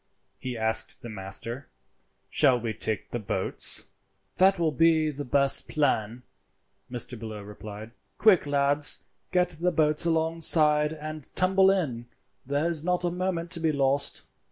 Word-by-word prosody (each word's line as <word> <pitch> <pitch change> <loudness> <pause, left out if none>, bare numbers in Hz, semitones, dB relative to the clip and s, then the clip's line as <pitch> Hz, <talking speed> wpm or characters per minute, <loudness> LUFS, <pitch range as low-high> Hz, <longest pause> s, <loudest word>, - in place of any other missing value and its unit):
He 125 -2 -5
asked 110 0 +1
the 120 - -7
master: 110 +6 -5 0.6
"Shall 125 -2 +3
we 115 -1 -4
take 110 0 -1
to 120 - -3
the - - -12
boats?" 95 -1 0 0.5
"That 190 +1 +4
will 165 -2 0
be 160 +1 +2
the 145 0 -6
best 140 +1 +2
plan," 125 -5 -1 0.7
Mr. 120 -1 -4
Bellew 110 -2 -8
replied. 105 +1 -10 0.3
"Quick, 195 -9 +4
lads, 145 +1 +3 0.3
get 180 -1 +2
the 180 +3 -2
boats 155 -2 +1
alongside 160 -2 +3
and 155 -2 -8
tumble 190 +1 +4
in; 135 -12 -1 0.4
there 145 +4 0
is 165 -3 0
not 180 0 -1
a 175 - 0
moment 175 -1 -3
to 175 - 0
be 160 -1 +1
lost." 140 0 0
145 Hz, 150 wpm, -26 LUFS, 120-165 Hz, 0.7 s, That